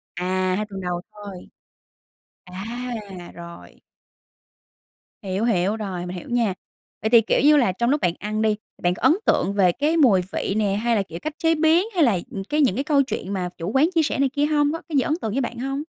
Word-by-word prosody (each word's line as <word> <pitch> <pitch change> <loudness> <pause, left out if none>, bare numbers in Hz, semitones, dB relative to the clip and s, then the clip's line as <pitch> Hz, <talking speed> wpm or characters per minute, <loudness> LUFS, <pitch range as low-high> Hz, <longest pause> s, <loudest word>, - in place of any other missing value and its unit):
À, 185 +1 0
2 210 +2 -2
tuần 195 -1 -7
đầu 175 -1 -3
thôi. 200 -3 -10 1.0
À, 205 +7 -6 0.5
rồi. 170 0 -12 1.4
Hiểu, 195 +2 -2
hiểu, 200 -2 +1
rồi, 190 -5 -4
mình 180 +1 -6
hiểu - - -9
nha. 235 -5 +1 0.5
Vậy 220 - 0
thì, 230 0 +7
kiểu 225 - +1
như 300 +1 +6
là, 240 -9 +3
trong 235 +6 -1
lúc 290 +2 +1
bạn 175 - +1
ăn 215 +1 -3
đi, 215 -1 +2 0.3
bạn 175 0 +3
có - - -11
ấn - - +5
tượng 195 +3 +2
về 190 -3 +4
cái 300 - 0
mùi 235 - +5
vị - - -2
nè, 205 -2 +1
hay 230 +3 +1
là, 200 - +1
kiểu, 170 -2 -9
cách 310 - -4
chế 325 0 +4
biến, 325 +5 +3
hay 340 - +4
là, 220 -9 +3
ừm, 195 -5 -5
cái 300 +1 +1
những 255 -10 +3
cái 270 - -1
câu 285 -2 +3
chuyện 200 -7 -5
mà 180 -2 -2
chủ 170 +4 -4
quán 290 +5 +4
chia 325 - +4
sẻ 290 - -2
này 275 -1 +3
kia 285 +2 0
hông, 295 -1 +2
có 330 - -5
cái 310 - -3
gì - - +5
ấn 300 - 0
tượng 220 - -2
với 270 - 0
bạn 240 -1 -4
hông? 270 +3 -3
220 Hz, 235 wpm, -23 LUFS, 185-280 Hz, 1.4 s, thì